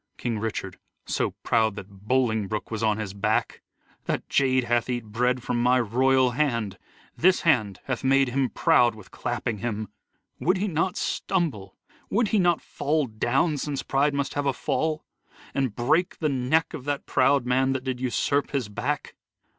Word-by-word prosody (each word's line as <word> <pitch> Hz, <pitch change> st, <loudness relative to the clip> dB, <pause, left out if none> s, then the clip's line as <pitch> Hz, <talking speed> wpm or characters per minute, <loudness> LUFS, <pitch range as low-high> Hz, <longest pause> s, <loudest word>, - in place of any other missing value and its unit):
King 115 Hz, -3 st, -2 dB
Richard: 110 Hz, 0 st, -4 dB, 0.3 s
So -, -, -1 dB
proud 110 Hz, -3 st, +2 dB
that 100 Hz, 0 st, -11 dB
Bolingbroke 110 Hz, -5 st, 0 dB
was 110 Hz, -1 st, -3 dB
on 110 Hz, -2 st, +2 dB
his 105 Hz, -3 st, -4 dB
back! 105 Hz, +2 st, -1 dB, 0.4 s
That -, -, -2 dB
jade 130 Hz, -2 st, +3 dB
hath 120 Hz, 0 st, 0 dB
eat 120 Hz, -2 st, -2 dB
bread 125 Hz, +3 st, 0 dB
from 120 Hz, -1 st, -1 dB
my 125 Hz, +1 st, +4 dB
royal 130 Hz, +3 st, +3 dB
hand, 115 Hz, -8 st, -1 dB, 0.4 s
This 185 Hz, +2 st, +3 dB
hand 105 Hz, -, +2 dB
hath 130 Hz, -1 st, -3 dB
made 135 Hz, 0 st, +4 dB
him 130 Hz, 0 st, 0 dB
proud 120 Hz, 0 st, +3 dB
with 105 Hz, -4 st, -14 dB
clapping 110 Hz, -4 st, -3 dB
him. 110 Hz, -1 st, -3 dB, 0.5 s
Would 180 Hz, +3 st, +2 dB
he 200 Hz, +3 st, -1 dB
not 180 Hz, +1 st, -1 dB
stumble? 140 Hz, -, -2 dB, 0.3 s
Would 220 Hz, 0 st, +1 dB
he 215 Hz, -, +2 dB
not 175 Hz, -3 st, +2 dB
fall 150 Hz, +1 st, 0 dB
down, 130 Hz, +7 st, 0 dB
Since 145 Hz, -1 st, -3 dB
pride 140 Hz, +1 st, +1 dB
must 140 Hz, -1 st, -1 dB
have 145 Hz, -1 st, -1 dB
a 135 Hz, -, +2 dB
fall, 155 Hz, +4 st, -1 dB, 0.5 s
and 135 Hz, -6 st, -1 dB
break 155 Hz, +9 st, +1 dB
the 155 Hz, -, 0 dB
neck 140 Hz, +6 st, +1 dB
Of 140 Hz, -5 st, -7 dB
that 145 Hz, -1 st, -2 dB
proud 135 Hz, 0 st, +3 dB
man 130 Hz, +2 st, +2 dB
that 130 Hz, -1 st, -3 dB
did 130 Hz, -2 st, -3 dB
usurp 140 Hz, +3 st, 0 dB
his 130 Hz, -7 st, -2 dB
back 105 Hz, -, -3 dB
130 Hz, 170 wpm, -26 LUFS, 110-145 Hz, 0.5 s, my